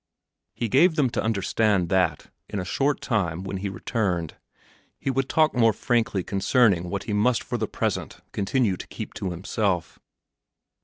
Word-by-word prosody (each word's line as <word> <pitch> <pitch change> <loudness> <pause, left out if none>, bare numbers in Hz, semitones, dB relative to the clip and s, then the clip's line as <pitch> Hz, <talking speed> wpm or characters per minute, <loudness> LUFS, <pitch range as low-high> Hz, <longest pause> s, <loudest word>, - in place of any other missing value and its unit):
He 120 - -1
gave 160 - +4
them 140 -6 +2
to - - -1
understand 105 -3 +1
that, 90 -5 +1 0.2
in - - -4
a 90 - -3
short 135 +9 0
time, 90 -7 -1
when 95 0 -4
he 100 +1 -3
returned, 95 -6 -2 0.6
he 135 - -2
would 135 0 -1
talk 155 -1 +3
more 115 -3 +4
frankly 110 -4 0
concerning 100 -3 +2
what 100 0 -3
he 105 - -3
must 115 +4 +2
for 120 -1 -3
the 110 - -1
present - - -2
continue 100 -1 0
to - - -8
keep - - -7
to 95 - -3
himself. 90 0 -2
105 Hz, 165 wpm, -25 LUFS, 95-120 Hz, 0.6 s, gave